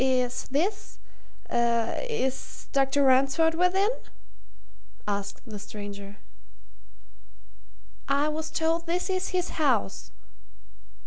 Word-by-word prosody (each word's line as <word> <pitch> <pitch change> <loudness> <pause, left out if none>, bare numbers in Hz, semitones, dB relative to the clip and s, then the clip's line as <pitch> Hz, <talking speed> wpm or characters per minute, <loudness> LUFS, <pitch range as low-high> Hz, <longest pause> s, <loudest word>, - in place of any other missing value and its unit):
"Is 255 -2 +1
this 380 +10 -1 0.5
is 240 - -1
Dr. 275 0 +3
Ransford 275 +5 +4
within?" 365 +5 +3 1.2
asked 200 -1 -2
the 215 -3 -7
stranger. 205 -1 -8 1.9
"I 280 +2 +3
was 315 +1 -2
told 325 +1 0
this 360 +3 0
is 370 0 0
his 365 -1 0
house." 245 -9 +1
275 Hz, 85 wpm, -27 LUFS, 235-335 Hz, 1.9 s, Ransford